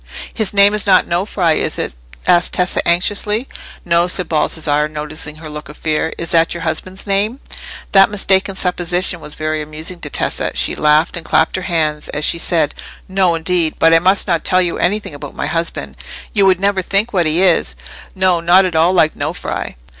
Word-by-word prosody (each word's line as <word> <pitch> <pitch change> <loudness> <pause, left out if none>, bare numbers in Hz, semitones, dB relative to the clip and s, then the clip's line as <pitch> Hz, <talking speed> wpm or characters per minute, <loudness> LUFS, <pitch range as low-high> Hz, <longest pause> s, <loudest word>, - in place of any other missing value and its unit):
"His 220 -4 +1
name 200 0 +5
is 210 -1 +1
not 185 -2 +5
Nofri, 175 -2 0
is - - -1
it?" - - -3 0.3
said 175 0 +3
Tessa, 180 0 0
anxiously. 205 +7 0 0.4
"No," 170 0 +2
said 180 -1 -2
Baldassarre, 150 -1 0
noticing 150 0 -5
her 155 0 -10
look 150 -1 -9
of 150 - -12
fear. 155 +1 -1
"Is 170 - -5
that 165 0 +2
your 170 - -6
husband's 185 +4 -2
name?" 205 +5 -1 0.5
That 195 -1 +6
mistaken 195 -1 +2
supposition 180 0 0
was 150 - -6
very 155 0 -2
amusing 155 +4 -6
to 150 - -6
Tessa. - - -2
She - - -1
laughed 150 +3 +2
and 170 - -5
clapped 160 0 +1
her 185 - -2
hands 155 -3 -1
as 150 +1 -3
she 170 - 0
said— 165 -3 0 0.3
"No, 185 -3 +1
indeed! 165 -1 -1
But 165 0 +4
I 165 - +6
must 190 +4 +3
not 170 -4 -1
tell 185 - +2
you 175 - -2
anything 205 -2 -1
about 145 -1 -9
my - - -3
husband. 165 0 -3 0.4
You 200 -2 +3
would 185 -2 +3
never 195 0 +1
think 200 +5 0
what 175 -4 +2
he 165 +4 +2
is—not 185 0 +1
at 180 -3 -3
all 165 +3 +3
like 160 -4 +3
Nofri!" 155 +5 -4
175 Hz, 190 wpm, -16 LUFS, 155-190 Hz, 0.5 s, That